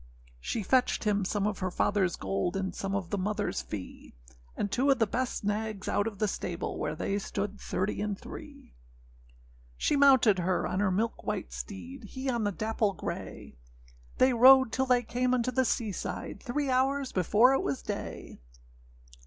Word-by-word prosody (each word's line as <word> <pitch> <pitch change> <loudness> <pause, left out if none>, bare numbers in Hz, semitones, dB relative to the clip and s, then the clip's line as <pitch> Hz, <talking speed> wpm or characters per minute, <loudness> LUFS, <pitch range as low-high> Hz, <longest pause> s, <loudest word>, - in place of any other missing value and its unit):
â - - -21 0.4
She 215 - -3
fetched 255 +5 +2
him 205 -2 +1
some 200 +2 -1
of 210 - -1
her 185 -2 -1
fatherâs 190 -1 +1
gold, 95 - -2
And 190 -1 -2
some 195 0 -3
of 195 -3 -3
the 205 - 0
motherâs 210 +2 -2
fee; 95 - -8 0.4
And 205 - -2
two 265 +6 +2
of 270 - +5
the 225 - +3
best 250 +3 -2
nags 210 -1 -2
out 205 - +1
of 210 -3 -5
the 215 - +1
stable, 175 -3 -4
Where 155 - -2
they 195 +5 -1
stood 200 0 -4
thirty 190 +3 -2
and 210 -2 -2
three. - - -11 1.0
She - - +1
mounted 265 -8 +5
her 180 +1 0
on 185 - -1
her 205 -1 +2
milk 220 +5 -1
white - - -3
steed, 95 - -8
He 260 +5 -3
on 235 -3 -1
the 205 - +1
dapple 215 0 0
grey; - - -7 0.6
They 255 0 +4
rode 260 +1 +7
till 265 0 0
they 250 -1 +3
came 250 +2 0
unto 250 0 0
the 260 +1 +2
sea 220 -2 0
side, 195 - -5
Three 275 +2 -1
hours 265 +1 +1
before 210 +8 +4
it 270 - +2
was 140 -1 -3
day. - - -6
210 Hz, 185 wpm, -29 LUFS, 190-250 Hz, 1.0 s, rode